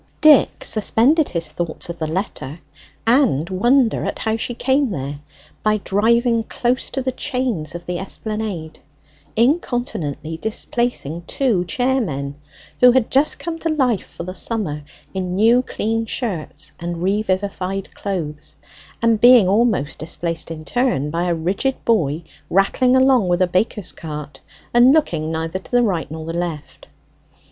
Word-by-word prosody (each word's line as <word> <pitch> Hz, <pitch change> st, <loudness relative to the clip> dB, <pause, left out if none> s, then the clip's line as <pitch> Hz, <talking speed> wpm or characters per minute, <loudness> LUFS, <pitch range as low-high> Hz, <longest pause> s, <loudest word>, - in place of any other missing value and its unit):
Dick 305 Hz, -3 st, +5 dB
suspended 255 Hz, +8 st, +3 dB
his 170 Hz, -2 st, -3 dB
thoughts 170 Hz, -2 st, -4 dB
of 170 Hz, 0 st, -7 dB
the 160 Hz, -, -1 dB
letter 165 Hz, -3 st, -4 dB, 0.5 s
and 230 Hz, -, +3 dB
wonder 240 Hz, +5 st, +3 dB
at -, -, -3 dB
how 220 Hz, 0 st, -1 dB
she 230 Hz, +2 st, -3 dB
came 265 Hz, +2 st, +1 dB
there 140 Hz, -5 st, -4 dB, 0.4 s
by 215 Hz, 0 st, +2 dB
driving 230 Hz, +4 st, +2 dB
close 245 Hz, +3 st, -1 dB
to 265 Hz, -, -3 dB
the 260 Hz, -, 0 dB
chains 245 Hz, -, -2 dB
of 175 Hz, 0 st, -7 dB
the 180 Hz, -1 st, -3 dB
Esplanade 200 Hz, -5 st, -5 dB, 0.6 s
incontinently 230 Hz, -, 0 dB
displacing 220 Hz, -, -1 dB
two 235 Hz, -10 st, +1 dB
chairmen, 180 Hz, -, -1 dB, 0.4 s
who 250 Hz, -1 st, +7 dB
had 255 Hz, -3 st, +2 dB
just 280 Hz, +3 st, +3 dB
come 330 Hz, -1 st, -5 dB
to 330 Hz, -, -1 dB
life 260 Hz, -, +1 dB
for -, -, -8 dB
the 185 Hz, +1 st, -6 dB
summer 190 Hz, -9 st, -3 dB, 0.3 s
in 185 Hz, -1 st, -3 dB
new 230 Hz, +5 st, +5 dB
clean 225 Hz, -2 st, -2 dB
shirts 170 Hz, -, -4 dB
and 170 Hz, 0 st, -4 dB
revivified 195 Hz, -1 st, -1 dB
clothes, 165 Hz, -7 st, -5 dB, 0.5 s
and 230 Hz, -2 st, +3 dB
being 245 Hz, -5 st, +8 dB
almost 200 Hz, -, +1 dB
displaced 165 Hz, 0 st, -3 dB
in 155 Hz, -1 st, -7 dB
turn 240 Hz, -, 0 dB
by 170 Hz, +2 st, -1 dB
a 175 Hz, -1 st, +1 dB
rigid 195 Hz, +11 st, -1 dB
boy 170 Hz, -8 st, +1 dB, 0.3 s
rattling 225 Hz, +7 st, +3 dB
along 260 Hz, -6 st, +4 dB
with 175 Hz, 0 st, +1 dB
a -, -, +5 dB
baker's 185 Hz, +2 st, -1 dB
cart, 150 Hz, -3 st, -8 dB, 0.3 s
and 245 Hz, +3 st, +6 dB
looking 160 Hz, -, 0 dB
neither 160 Hz, +3 st, -3 dB
to -, -, -13 dB
the 245 Hz, -1 st, +3 dB
right 180 Hz, -10 st, -1 dB
nor 160 Hz, +1 st, -7 dB
the 165 Hz, -, -4 dB
left. 170 Hz, -3 st, -5 dB
200 Hz, 150 wpm, -20 LUFS, 165-245 Hz, 0.6 s, being